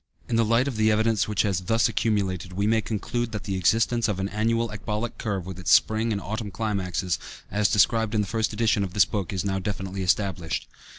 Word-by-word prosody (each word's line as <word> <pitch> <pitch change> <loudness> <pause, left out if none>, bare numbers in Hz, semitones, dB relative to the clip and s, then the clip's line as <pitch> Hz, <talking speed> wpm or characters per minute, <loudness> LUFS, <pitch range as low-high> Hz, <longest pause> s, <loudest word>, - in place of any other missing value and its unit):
In 120 - -1
the 115 - +4
light 115 +4 +2
of 130 -6 -3
the 110 0 +3
evidence 110 -1 +2
which 105 -2 +1
has 100 -4 0
thus 115 +5 +2
accumulated, 95 -4 -1
we 100 +3 -1
may 110 +1 +3
conclude 115 +2 -3
that 110 - -4
the 95 - -3
existence 115 +6 +2
of 105 -3 -2
an 95 +1 -1
annual 115 +2 0
ecbolic 110 +2 -4
curve, 100 -5 -2
with 95 0 -7
its 90 - -3
spring 110 +1 +4
and 100 - -1
autumn 110 +1 -4
climaxes, 95 -4 -2 0.3
as 105 -1 +2
described 110 +1 +3
in 105 - +3
the - - -1
first 110 0 0
edition 105 -2 +1
of 95 -2 -5
this 100 - +6
book, 100 -4 -3
is 95 -1 -2
now 95 -1 0
definitely 95 0 -4
established. 90 -3 -1
105 Hz, 220 wpm, -25 LUFS, 95-110 Hz, 0.3 s, this